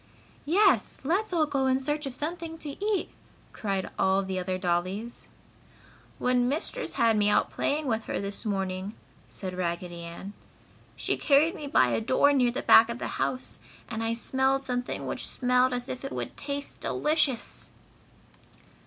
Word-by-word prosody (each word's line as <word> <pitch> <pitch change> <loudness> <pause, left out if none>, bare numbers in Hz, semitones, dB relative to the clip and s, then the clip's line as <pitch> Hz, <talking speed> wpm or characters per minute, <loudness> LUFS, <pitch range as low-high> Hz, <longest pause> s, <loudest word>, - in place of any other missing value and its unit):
"Yes! 390 +5 +3
Let's 370 +9 0
all 330 -3 +3
go 275 -3 0
in 260 0 +3
search 295 +2 -1
of 255 - -3
something 325 +2 -4
to 305 - -7
eat!" 415 -2 0 0.4
cried 195 -3 -2
all 190 +1 +3
the 190 -1 -3
other 185 0 -2
dollies. 185 +6 -2 0.9
"When 250 -1 +2
Mistress 325 - -2
had 230 -1 +3
me 210 -1 +3
out - - +2
playing 300 +2 -1
with 225 -4 -1
her - - -2
this 200 0 -5
morning," 195 -1 -2 0.3
said 185 -2 -4
Raggedy 175 -1 -3
Ann, 170 +4 -8 0.6
"she - - -1
carried 300 +4 +4
me 300 -7 -7
by 130 - +4
a 120 - 0
door 260 +5 +4
near 250 -3 +4
the 250 +3 -3
back 225 +1 +7
of 235 - -3
the - - -4
house 130 -4 -2 0.3
and 220 - -3
I 225 0 0
smelled 265 +3 +1
something 245 -1 -3
which - - -2
smelled 250 0 +2
as 245 0 -2
if 255 - -5
it 275 - -5
would - - -4
taste 285 0 -5
delicious!" 295 -6 0
245 Hz, 165 wpm, -28 LUFS, 195-285 Hz, 0.9 s, back